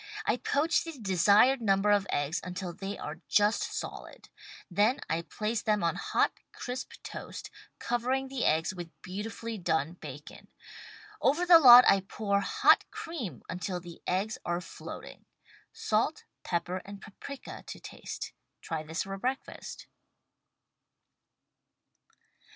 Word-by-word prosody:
I - - +2
poach 310 +4 +1
the 330 -3 -7
desired 210 +5 +4
number 200 -1 +3
of 200 -1 +3
eggs 145 +3 -1
until 180 0 -5
they 195 +3 -5
are 155 +3 -7
just 210 +1 +3
solid. - - -6 0.4
Then 210 +8 +3
I 165 +1 0
place 215 +5 -2
them 210 -3 +1
on 170 - +2
hot, - - +1 0.2
crisp 250 0 -6
toast, - - -7 0.3
covering 255 +3 -1
the 265 -2 -3
eggs 160 +4 +2
with 175 -2 -9
beautifully 220 +3 -5
done 160 -2 0
bacon. 180 - -10 0.7
Over 310 +7 +3
the 345 -2 +9
lot, 250 -4 +11
I 195 - +6
pour 200 +1 -1
hot - - +4
cream 240 - -6
until 180 +1 -3
the 175 -1 -11
eggs 200 +5 -1
are 175 0 -1
floating. 180 - -9 0.5
Salt, - - 0 0.2
pepper 175 +1 -2
and 200 0 -9
paprika 255 +7 -9
to - - -7
taste. - - -7 0.3
Try 160 -2 -4
this 160 +3 -3
for 195 0 -5
breakfast. 260 +6 -4
200 Hz, 130 wpm, -30 LUFS, 175-240 Hz, 0.7 s, lot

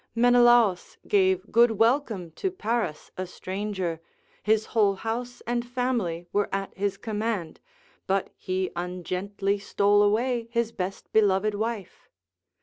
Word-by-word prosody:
Menelaus 240 -5 +4
gave 190 -1 +2
good 235 +2 +6
welcome 225 - +1
to 385 - -2
Paris 230 - -3
a 185 0 -3
stranger, 185 -3 -4 0.4
his 220 0 +2
whole 205 -3 +3
house 240 +4 -4
and 240 0 -1
family 240 -9 -2
were 205 0 +1
at 195 0 -3
his 200 0 -1
command, 210 -7 -3 0.5
but 195 0 0
he 185 -1 -2
ungently 185 +3 -2
stole 205 0 +3
away 230 +3 +1
his 235 -1 0
best 190 -2 -5
beloved 210 -1 +3
wife. 215 -2 -4
205 Hz, 125 wpm, -26 LUFS, 190-235 Hz, 0.5 s, good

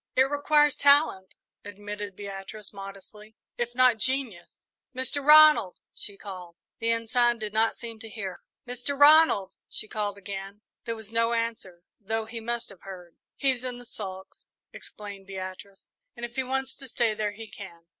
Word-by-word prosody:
"It 260 - +6
requires 290 +1 +3
talent," 280 -10 +4 0.3
admitted 205 0 -7
Beatrice, 200 +1 -9
modestly, 200 +2 -11 0.2
"if 240 0 -2
not 250 -3 +4
genius. 255 -8 -3 0.3
Mr. 260 +2 -1
Ronald!" 300 -9 +8 0.2
she 200 -1 -8
called. 180 -4 -9 0.2
The 230 - 0
Ensign 235 +1 +2
did 215 -2 -5
not 220 +1 +2
seem 230 -2 -8
to 225 -1 -9
hear. 195 -5 -6 0.3
"Mr. 250 +3 -4
Ronald!" 290 -10 +6 0.2
she 215 - -6
called 205 -2 -3
again. 200 +1 -7 0.2
There 230 -1 -2
was 220 -1 -10
no 230 +1 +2
answer, 225 -7 -3 0.2
though 220 +1 -2
he 230 +1 -7
must 235 +1 -3
have 195 -3 -15
heard. 180 -3 -11 0.2
"He's 260 -3 0
in 250 -1 -5
the 245 - -12
sulks," 190 -4 -9 0.3
explained 200 -2 -10
Beatrice, 190 +1 -9 0.3
"and 240 - -5
if 235 - -11
he 265 - 0
wants 265 +1 -2
to 270 - -11
stay 230 -2 +1
there, 210 -1 -2
he 225 +1 -9
can." 175 -4 -11
220 Hz, 165 wpm, -27 LUFS, 195-245 Hz, 0.3 s, Ronald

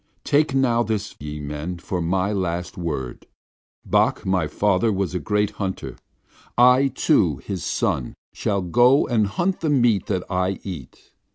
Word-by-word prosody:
Take 150 -1 +2
this - - -2
now, 120 -3 +3 0.4
ye 75 +1 -6
men, 75 +4 -5
for 90 +1 -4
my 95 +4 0
last 90 -3 -2
word. 75 -8 -5 0.6
Bok, - - +1
my 95 -4 +1
father, 105 +5 +1
was 95 -2 -1
a 90 - -1
great 105 +1 0
hunter. 95 -1 -4 0.6
I, 125 +3 +6
too, 90 - +2
his 95 -4 -4
son, 60 - -1 0.2
shall 100 -2 -1
go 120 - +4
and 110 -4 +1
hunt 175 - -1
the 160 - 0
meat 120 -8 +2
that 95 -3 -1
I 90 +1 -1
eat. 85 -10 -9
95 Hz, 155 wpm, -23 LUFS, 85-120 Hz, 0.6 s, I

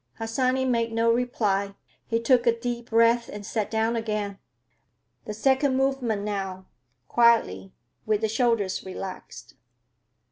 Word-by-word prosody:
Harsanyi 255 +3 0
made 235 -2 0
no 230 +1 +2
reply. 205 -5 0 0.3
He 230 - 0
took 240 +1 +3
a 230 0 +3
deep 240 0 -4
breath 230 +1 +3
and 205 0 -8
sat 215 +1 -2
down 225 +1 0
again. 210 -3 -3 0.9
"The 210 - -5
second 265 +3 +2
movement 265 -6 0
now, 195 -2 -4 0.4
quietly, 220 - +2 0.3
with 215 -1 +1
the 220 - +1
shoulders 225 -4 0
relaxed." 190 0 -8
230 Hz, 130 wpm, -25 LUFS, 205-240 Hz, 0.9 s, took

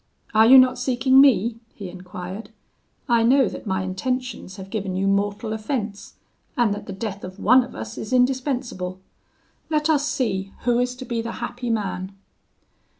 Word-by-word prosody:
"'Are 220 +1 +6
you 265 +2 +9
not 255 -1 +5
seeking 260 +1 +4
me?' 230 -4 +3 0.2
he 200 - -7
enquired. 180 +3 -8 0.6
'I 235 -1 +3
know 260 +4 +4
that - - -7
my 190 -1 -1
intentions 235 +1 -3
have 195 -1 -10
given 195 -4 -3
you 190 +1 0
mortal 205 +3 0
offence, 220 -2 -4 0.4
and 235 -4 +3
that 205 - -7
the - - -5
death 200 0 -5
of 185 +1 -8
one 255 +5 +5
of 245 - -11
us 110 0 -7
is 215 - -6
indispensable: 250 -7 0 0.7
let 305 0 +2
us 290 -1 +2
see 200 -10 -2
who 240 0 +2
is 250 0 0
to 255 +1 -8
be 235 -2 -2
the 230 0 -5
happy 245 0 -5
man.' 195 -3 -2
225 Hz, 170 wpm, -23 LUFS, 195-255 Hz, 0.7 s, you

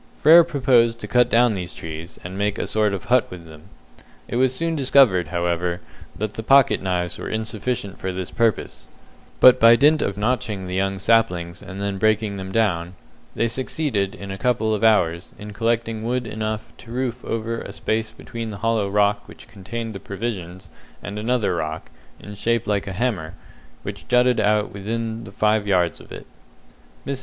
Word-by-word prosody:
Frere 165 +3 +9
proposed 130 -7 +2
to - - -5
cut 125 0 +3
down 120 0 +4
these 90 -3 -5
trees, 80 +1 -8
and 90 +2 -7
make 100 +1 -1
a - - -2
sort 110 -1 +1
of 100 -2 -4
hut 125 0 +3
with 90 -2 -10
them. 80 -1 -14 0.6
It - - -3
was 130 0 +3
soon 165 +5 -2
discovered, 130 - +4
however, 85 +1 -1 0.4
that 105 0 -3
the - - -5
pocket 135 +4 +4
knives 90 -2 -2
were - - -5
insufficient 110 -1 -3
for 95 - -3
this 90 -1 -5
purpose, 115 -3 -1 0.5
but 130 0 +8
by 115 0 +8
dint 150 +4 +4
of 100 - -2
notching 105 -3 -1
the 90 - -6
young 95 +1 0
saplings 95 -5 +1
and 100 -1 -9
then 100 -1 -3
breaking 110 -1 +1
them 95 0 -6
down, 95 -5 0 0.4
they 115 - +1
succeeded, 120 -4 -2
in 100 -1 -8
a 95 - -6
couple 110 -2 +1
of 105 0 -2
hours, 85 -6 +2
in 105 0 -9
collecting 115 0 -1
wood 125 +1 -1
enough 110 0 -4
to 115 - -14
roof 125 0 -3
over 115 +1 -3
a - - -8
space 110 0 -2
between 115 0 -7
the 105 - -6
hollow 110 -3 +1
rock 105 0 +1
which - - -14
contained 110 +3 -6
the 95 - -7
provisions 95 -3 -6 0.3
and 105 +1 -5
another 115 -2 0
rock, 80 0 -5 0.3
in 105 - -10
shape 115 +3 0
like 100 -1 -1
a 95 - -4
hammer, 95 -7 -2 0.5
which - - -7
jutted 125 -1 +3
out 105 0 +1
within 115 +3 -4
five 105 +1 0
yards 90 -4 +1
of - - -17
it. - - -9 0.8
Mrs. 140 -1 -3
110 Hz, 185 wpm, -22 LUFS, 95-115 Hz, 0.8 s, Frere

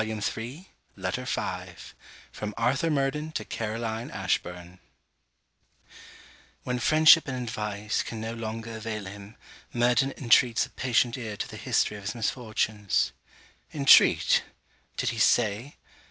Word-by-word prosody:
SIBELLA 110 0 -3
VALMONT 120 - -5 0.3
LETTER - - -3
V - - -3 0.6
FROM 105 -1 -6
ARTHUR 135 +8 +1
MURDEN 150 +1 -1
TO 155 - -3
CAROLINE 115 +1 -4
ASHBURN 90 0 -3 1.8
When 125 0 -2
friendship 155 +4 +6
and 130 -1 -3
advice 105 -2 -2
can 115 - -6
no 110 +1 -4
longer 115 0 -5
avail 110 -2 -5
him, 100 +2 -10 0.4
Murden 125 +3 +2
intreats 120 -2 +3
a - - -17
patient 125 0 +1
ear 110 -4 -5
to - - -3
the - - -10
history 105 - 0
of 100 - -11
his 105 - -3
misfortunes. 110 -3 -1 0.6
Intreat! 140 -2 +5 0.6
Did - - 0
he - - -4
say? 115 +4 +2
115 Hz, 125 wpm, -27 LUFS, 105-130 Hz, 1.8 s, friendship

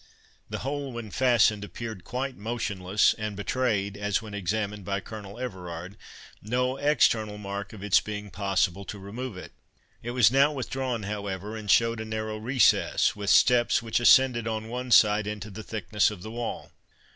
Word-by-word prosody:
The - - -3
whole, 140 -1 -3
when 115 -3 -7
fastened, 120 -5 +3
appeared 110 -2 -7
quite 130 +2 -4
motionless, 105 -4 0
and 105 -1 -3
betrayed, 100 -2 -1
as 100 0 0
when 110 -3 -10
examined 105 +1 -2
by 100 +1 -2
Colonel 100 0 -9
Everard, 90 -6 -6 0.5
no 125 +4 0
external 115 -7 +2
mark 100 0 -6
of 105 -3 -10
its 105 -2 +5
being 105 -1 -6
possible 100 -1 0
to 105 - -7
remove 105 +3 -7
it. 90 - -9 0.5
It 120 - -6
was 115 -2 +6
now 140 +3 +4
withdrawn, 130 -4 -3
however, 100 0 -4
and 110 -2 -7
showed 115 +2 +4
a 110 - -4
narrow 110 0 -4
recess, 125 +4 +3
with 100 -1 -3
steps 120 -1 +4
which 115 0 0
ascended 120 -1 +5
on 110 0 -3
one 125 +1 -4
side 105 -2 +5
into 105 0 -5
the 105 +3 -7
thickness 105 -1 0
of 100 -4 -9
the 110 - -7
wall. 120 0 -5
110 Hz, 170 wpm, -27 LUFS, 100-120 Hz, 0.5 s, was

